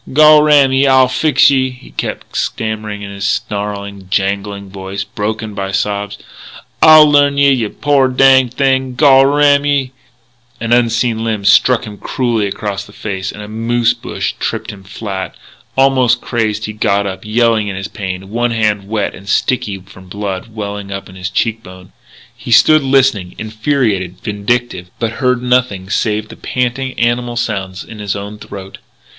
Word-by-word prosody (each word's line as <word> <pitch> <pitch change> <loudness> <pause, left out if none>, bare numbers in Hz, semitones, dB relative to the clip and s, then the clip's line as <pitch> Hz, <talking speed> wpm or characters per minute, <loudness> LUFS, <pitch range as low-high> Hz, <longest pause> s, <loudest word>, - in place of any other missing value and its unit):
"Gol 155 +1 +7
ram 145 -3 +4
ye, 135 +1 +3
I'll 130 -1 +5
fix 140 +2 +3
ye!" 130 -1 +1
he 125 -1 -14
kept - - -5
stammering 110 -2 -3
in 100 - -7
his 100 0 -3
snarling, 100 -1 -4
jangling 100 0 -2
voice, 95 0 -5
broken 110 +2 -4
by 100 -1 -4
sobs. 100 +1 -2 0.6
"I'll 155 -1 +9
learn 145 -1 +3
ye, 140 0 +5
yeh 120 -5 0
poor 140 -3 +3
danged 130 -1 +4
thing, 130 -2 +1
gol 135 -1 +5
ram 145 0 +3
ye 140 -3 0 0.4
" 120 0 -37
An 115 +1 -1
unseen 115 -1 +1
limb 110 -3 -2
struck 125 +4 +4
him 105 -1 -10
cruelly 115 -5 -1
across 100 0 -4
the 100 - -15
face, 95 -2 -5
and 105 - -9
a - - -9
moose 115 +2 0
bush - - -4
tripped - - -3
him 100 -2 -13
flat. 95 -2 -6 0.4
Almost 130 -3 +3
crazed, 110 -3 -2
he 110 - -6
got 100 -1 0
up, 95 -1 -5
yelling 110 0 +1
in 100 - -4
his 95 +1 -5
pain, 95 -1 -6
one 120 +2 0
hand 105 -3 0
wet 105 -2 -1
and 100 +1 -12
sticky 100 -4 0
from 95 0 -16
blood 100 -1 -5
welling 100 -2 -6
up 100 0 -5
from 95 - -14
his 90 -1 -4
cheek 115 +4 -1
bone. 90 -2 -14 0.4
He 120 +1 -10
stood 155 +7 +6
listening, 130 -9 +1
infuriated, 110 - -1
vindictive, 105 -3 -2
but 115 -2 -2
heard 125 -1 +1
nothing 125 -7 0
save 110 0 -1
the - - -11
panting, 130 +1 -3
animal 120 0 0
sounds 100 -5 -3
in 110 - -11
his 105 -2 -3
own 100 +1 -7
throat. 95 -2 -10
110 Hz, 170 wpm, -15 LUFS, 100-125 Hz, 0.6 s, I'll